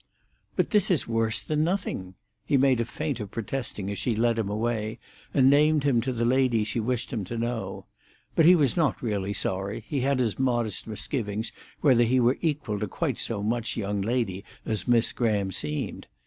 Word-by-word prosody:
"But -, -, 0 dB
this 210 Hz, -4 st, +3 dB
is 175 Hz, -7 st, +1 dB
worse 115 Hz, -1 st, 0 dB
than 155 Hz, 0 st, 0 dB
nothing." 155 Hz, -, -2 dB, 0.3 s
He 145 Hz, -, +2 dB
made 130 Hz, -2 st, +4 dB
a -, -, -1 dB
feint 145 Hz, 0 st, -3 dB
of 105 Hz, -2 st, -5 dB
protesting 115 Hz, -3 st, -4 dB
as 100 Hz, -, -4 dB
she 120 Hz, -, 0 dB
led 115 Hz, +1 st, +2 dB
him 105 Hz, -3 st, -1 dB
away, 110 Hz, 0 st, -2 dB, 0.3 s
and 130 Hz, -2 st, +4 dB
named 150 Hz, +1 st, +4 dB
him 130 Hz, -5 st, +3 dB
to 130 Hz, +3 st, -2 dB
the 115 Hz, -1 st, -1 dB
lady 125 Hz, -3 st, +3 dB
she 110 Hz, +2 st, -2 dB
wished 125 Hz, +3 st, -2 dB
him 110 Hz, -4 st, -2 dB
to 115 Hz, +6 st, -5 dB
know. 120 Hz, 0 st, -3 dB, 0.5 s
But 165 Hz, -, +5 dB
he 180 Hz, -, +9 dB
was 145 Hz, -7 st, +2 dB
not 155 Hz, -7 st, +1 dB
really 100 Hz, -4 st, -1 dB
sorry; 100 Hz, +3 st, -2 dB
he 145 Hz, -, -1 dB
had 140 Hz, +1 st, +2 dB
his 120 Hz, -3 st, 0 dB
modest 120 Hz, -7 st, 0 dB
misgivings 110 Hz, 0 st, -2 dB, 0.3 s
whether 130 Hz, -5 st, +5 dB
he 125 Hz, +2 st, +3 dB
were 125 Hz, +2 st, +3 dB
equal 145 Hz, -10 st, -1 dB
to 105 Hz, -, -2 dB
quite -, -, -2 dB
so 105 Hz, -3 st, 0 dB
much 115 Hz, +2 st, -1 dB
young 100 Hz, -2 st, -1 dB
lady 105 Hz, -3 st, -1 dB, 0.2 s
as 110 Hz, +2 st, -1 dB
Miss 120 Hz, -1 st, +3 dB
Graham 105 Hz, -5 st, 0 dB
seemed. 75 Hz, -4 st, -3 dB
115 Hz, 195 wpm, -27 LUFS, 105-135 Hz, 0.5 s, he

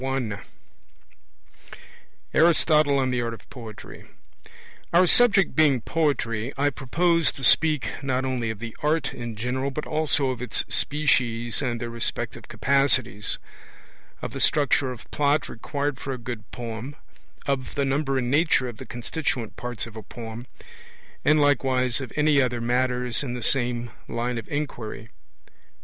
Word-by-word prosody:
M 130 Hz, -6 st, -2 dB, 1.9 s
ARISTOTLE 155 Hz, -3 st, +4 dB
ON 130 Hz, -1 st, +1 dB
THE 125 Hz, -1 st, 0 dB
ART 115 Hz, -1 st, -3 dB
OF 110 Hz, -, -19 dB
POETRY 115 Hz, -5 st, -10 dB
1 -, -, -17 dB, 0.9 s
Our 180 Hz, +2 st, +6 dB
subject 205 Hz, 0 st, +5 dB
being 150 Hz, -5 st, +4 dB
Poetry, 130 Hz, -7 st, 0 dB
I 145 Hz, +1 st, +2 dB
propose 165 Hz, +5 st, +2 dB
to 135 Hz, -, -8 dB
speak 155 Hz, +2 st, +5 dB
not 130 Hz, -1 st, -1 dB
only 125 Hz, -3 st, -1 dB
of 110 Hz, -, -4 dB
the 115 Hz, +1 st, -7 dB
art 150 Hz, -2 st, 0 dB
in 120 Hz, -2 st, -6 dB
general 125 Hz, +5 st, -2 dB
but 150 Hz, +2 st, -4 dB
also 150 Hz, -3 st, +1 dB
of 125 Hz, -, -6 dB
its 125 Hz, -, 0 dB
species 120 Hz, -6 st, +1 dB
and 120 Hz, -1 st, -1 dB
their 120 Hz, 0 st, -4 dB
respective 115 Hz, 0 st, -3 dB
capacities; 130 Hz, -7 st, +1 dB, 0.9 s
of -, -, -4 dB
the -, -, -5 dB
structure 140 Hz, -2 st, +3 dB
of 125 Hz, -, -9 dB
plot 145 Hz, 0 st, +2 dB
required 140 Hz, +3 st, -3 dB
for 135 Hz, -, -4 dB
a -, -, -5 dB
good 120 Hz, -2 st, -7 dB
poem; 120 Hz, +3 st, -6 dB, 0.5 s
of 135 Hz, -2 st, -2 dB
the 140 Hz, -, +1 dB
number 135 Hz, 0 st, 0 dB
and 125 Hz, -1 st, -1 dB
nature 150 Hz, -3 st, +3 dB
of 120 Hz, -3 st, -7 dB
the 130 Hz, -, -9 dB
constituent 120 Hz, -1 st, -3 dB
parts 120 Hz, -2 st, -4 dB
of 115 Hz, -1 st, -12 dB
a 110 Hz, -, -6 dB
poem; 115 Hz, +3 st, -8 dB, 0.8 s
and 150 Hz, +1 st, +4 dB
likewise 130 Hz, -3 st, +2 dB
of 130 Hz, -, -6 dB
any 150 Hz, -2 st, +4 dB
other 125 Hz, -2 st, 0 dB
matters 125 Hz, +1 st, +1 dB
in 125 Hz, -4 st, -4 dB
the 120 Hz, -, -5 dB
same 120 Hz, -2 st, 0 dB, 0.2 s
line 120 Hz, 0 st, -2 dB
of 110 Hz, -, -10 dB
inquiry. 120 Hz, -6 st, -4 dB
130 Hz, 155 wpm, -25 LUFS, 120-145 Hz, 1.9 s, Our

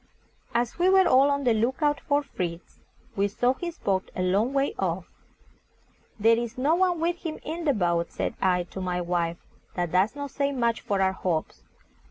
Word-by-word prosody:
As 240 Hz, +5 st, 0 dB
we 360 Hz, +2 st, +4 dB
were 380 Hz, -1 st, +5 dB
all 265 Hz, +2 st, +5 dB
on 280 Hz, 0 st, 0 dB
the 245 Hz, -3 st, +3 dB
look 240 Hz, +7 st, 0 dB
out 295 Hz, 0 st, +2 dB
for 290 Hz, 0 st, +1 dB
Fritz, 175 Hz, -9 st, -6 dB, 0.4 s
we 200 Hz, 0 st, +2 dB
saw 245 Hz, +5 st, +1 dB
his 340 Hz, +4 st, -6 dB
boat 190 Hz, -2 st, -1 dB
a 185 Hz, -, -1 dB
long 200 Hz, +7 st, +2 dB
way 275 Hz, 0 st, +1 dB
off. 180 Hz, -1 st, -1 dB, 1.1 s
"There 225 Hz, +2 st, +4 dB
is 235 Hz, +1 st, -5 dB
no 280 Hz, +5 st, +2 dB
one 355 Hz, -1 st, +2 dB
with 340 Hz, +2 st, 0 dB
him 325 Hz, -3 st, -5 dB
in 330 Hz, +2 st, -5 dB
the 290 Hz, -, +3 dB
boat," 170 Hz, -3 st, 0 dB
said -, -, -2 dB
I 180 Hz, -2 st, +2 dB
to 190 Hz, -, -5 dB
my 180 Hz, -1 st, -1 dB
wife; 170 Hz, -1 st, -1 dB, 0.4 s
"that 175 Hz, -2 st, -1 dB
does 190 Hz, +7 st, +2 dB
not 285 Hz, -1 st, -5 dB
say 280 Hz, 0 st, 0 dB
much 235 Hz, -4 st, 0 dB
for 195 Hz, -1 st, 0 dB
our 190 Hz, 0 st, +2 dB
hopes." 160 Hz, -, -2 dB
230 Hz, 200 wpm, -26 LUFS, 185-285 Hz, 1.1 s, were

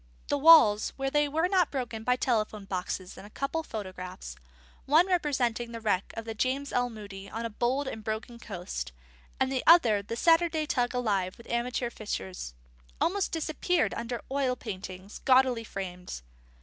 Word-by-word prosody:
The 290 Hz, -, +2 dB
walls, 275 Hz, -9 st, +7 dB
where 270 Hz, 0 st, -1 dB
they 295 Hz, 0 st, +3 dB
were 320 Hz, +4 st, +1 dB
not 365 Hz, -3 st, +3 dB
broken 240 Hz, -5 st, -4 dB
by 250 Hz, +2 st, +3 dB
telephone 215 Hz, -5 st, -1 dB
boxes 185 Hz, -1 st, -4 dB
and 205 Hz, -, -10 dB
a -, -, -15 dB
couple 275 Hz, +8 st, -2 dB
of 315 Hz, -, -16 dB
photographs 185 Hz, -3 st, -7 dB, 0.5 s
one 310 Hz, +5 st, +6 dB
representing 260 Hz, -10 st, 0 dB
the 230 Hz, -, -5 dB
wreck 205 Hz, -4 st, 0 dB
of 225 Hz, -, -4 dB
the 225 Hz, -, -4 dB
James 265 Hz, +5 st, -1 dB
L. 245 Hz, 0 st, +1 dB
Moody 200 Hz, -3 st, -9 dB
on 225 Hz, +2 st, -4 dB
a 230 Hz, -, -4 dB
bold 255 Hz, +6 st, 0 dB
and 220 Hz, -4 st, -5 dB
broken 220 Hz, +3 st, -4 dB
coast, 175 Hz, -, -5 dB, 0.5 s
the 265 Hz, -1 st, 0 dB
other 240 Hz, -12 st, +7 dB
the 205 Hz, +3 st, -5 dB
Saturday 330 Hz, +2 st, +3 dB
tug 250 Hz, -6 st, 0 dB
alive 200 Hz, -7 st, 0 dB
with 235 Hz, -, -14 dB
amateur 240 Hz, 0 st, -1 dB
fishers 190 Hz, -, -5 dB, 0.4 s
almost 390 Hz, +2 st, +1 dB
disappeared 325 Hz, +1 st, 0 dB
under 235 Hz, 0 st, -4 dB
oil 270 Hz, -2 st, +1 dB
paintings 190 Hz, -3 st, -7 dB
gaudily 255 Hz, -3 st, +4 dB
framed. 180 Hz, -, -6 dB
235 Hz, 165 wpm, -29 LUFS, 205-280 Hz, 0.5 s, walls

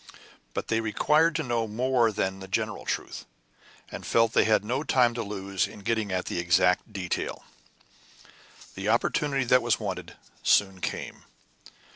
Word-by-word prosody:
But -, -, -3 dB
they 110 Hz, 0 st, +1 dB
required 150 Hz, +9 st, +2 dB
to 160 Hz, -, 0 dB
know 120 Hz, -3 st, -1 dB
more 120 Hz, +1 st, +2 dB
than 95 Hz, -2 st, -2 dB
the 95 Hz, -, -9 dB
general 95 Hz, -, -2 dB
truth, -, -, -4 dB, 0.6 s
and -, -, -7 dB
felt 115 Hz, -1 st, +2 dB
that -, -, +4 dB
they -, -, +5 dB
had 105 Hz, -2 st, +2 dB
no 125 Hz, +5 st, -1 dB
time 125 Hz, -5 st, +3 dB
to 120 Hz, -, -3 dB
lose 100 Hz, -2 st, -2 dB
in -, -, -12 dB
getting 110 Hz, -1 st, -1 dB
at 90 Hz, 0 st, -1 dB
the -, -, -3 dB
exact 90 Hz, +4 st, +2 dB
details. 95 Hz, -4 st, -3 dB, 1.3 s
The 95 Hz, +2 st, -3 dB
opportunity 135 Hz, +4 st, +1 dB
that 125 Hz, +1 st, +4 dB
was 120 Hz, -2 st, +1 dB
wanted 90 Hz, -5 st, -5 dB, 0.3 s
soon 95 Hz, -2 st, +2 dB
came. -, -, -5 dB
110 Hz, 160 wpm, -27 LUFS, 95-120 Hz, 1.3 s, they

